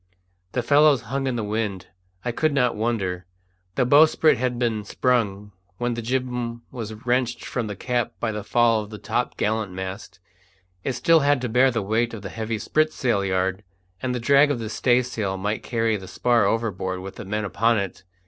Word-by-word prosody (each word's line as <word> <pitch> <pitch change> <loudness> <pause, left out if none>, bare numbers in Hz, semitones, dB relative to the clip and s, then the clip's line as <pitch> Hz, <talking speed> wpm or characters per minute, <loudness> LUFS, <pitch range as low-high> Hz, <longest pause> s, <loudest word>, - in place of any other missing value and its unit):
The 125 - 0
fellows 145 -1 +5
hung 135 0 0
in 130 - -1
the 115 - -2
wind. 105 -3 -2 0.4
I 120 - 0
could 155 +5 +1
not 125 -3 +2
wonder. 100 -6 -2 0.5
The 125 - +2
bowsprit 155 +3 +5
had 125 0 -1
been 115 -3 0
sprung 105 -3 0 0.3
when 120 0 -1
the 115 - -4
jibboom 125 -1 -2
was 115 -4 -5
wrenched 125 -1 0
from 120 -3 -3
the 105 - -5
cap 120 +3 -1
by 115 - -1
the 105 -1 -5
fall 115 0 +3
of 105 - -9
the 105 - -8
top - - -2
gallant 105 -3 -1
mast; 95 +2 -7 0.6
it 135 - -1
still 165 +6 +4
had 145 -1 +3
to 125 - -2
bear 125 +4 +4
the 115 -4 -1
weight 115 +3 0
of 105 - -9
the 100 - -5
heavy 110 +2 -3
spritsail 125 -5 +1
yard, 95 +1 -1 0.4
and 125 -1 -1
the - - -2
drag 140 +4 +5
of 145 - 0
the 115 -2 -5
staysail 120 -6 +1
might 105 +3 -2
carry 115 -2 0
the 95 -1 -10
spar 115 +1 +2
overboard 95 -4 -1
with 95 +1 -8
the 115 - -6
men 105 +2 -2
upon 115 +3 +2
it. 100 -2 -4
115 Hz, 195 wpm, -24 LUFS, 105-125 Hz, 0.6 s, fellows